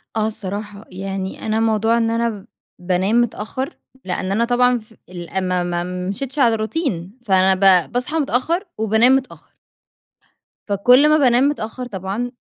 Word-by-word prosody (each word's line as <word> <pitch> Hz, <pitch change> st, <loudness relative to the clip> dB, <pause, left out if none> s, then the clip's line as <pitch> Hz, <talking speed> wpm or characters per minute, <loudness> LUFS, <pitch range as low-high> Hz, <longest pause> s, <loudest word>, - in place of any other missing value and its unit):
آه، 215 Hz, 0 st, +1 dB
الصراحة. 205 Hz, 0 st, -6 dB
يعني 190 Hz, 0 st, -5 dB
أنا 220 Hz, 0 st, 0 dB
موضوع 225 Hz, +1 st, +2 dB
إن 225 Hz, -1 st, +1 dB
أنا 230 Hz, -3 st, -2 dB, 0.3 s
بانام 190 Hz, +6 st, +1 dB
متأخر، 240 Hz, +3 st, -4 dB, 0.3 s
لأن 185 Hz, +1 st, -3 dB
أنا 230 Hz, +4 st, +1 dB
طبعًا 245 Hz, 0 st, +2 dB
ف 220 Hz, +1 st, -19 dB, 0.2 s
ال 185 Hz, +1 st, -4 dB
ما 180 Hz, -1 st, 0 dB
ما 175 Hz, 0 st, -2 dB, 0.3 s
مشيتش 270 Hz, +7 st, -3 dB
على 235 Hz, -4 st, +4 dB
روتين 220 Hz, -, -3 dB
فأنا 190 Hz, -1 st, +4 dB, 0.3 s
ب -, -, -20 dB
باصحى 250 Hz, +6 st, -2 dB
متأخر، 315 Hz, -, 0 dB
وبانام 220 Hz, +4 st, +4 dB
متأخر. 270 Hz, -1 st, -5 dB, 1.1 s
فكُل 245 Hz, +9 st, +5 dB
ما 310 Hz, -, +5 dB
بانام 250 Hz, -2 st, +4 dB
متأخر 250 Hz, -2 st, -5 dB
طبعًا، 200 Hz, +4 st, -4 dB
220 Hz, 145 wpm, -20 LUFS, 195-245 Hz, 1.1 s, فكُل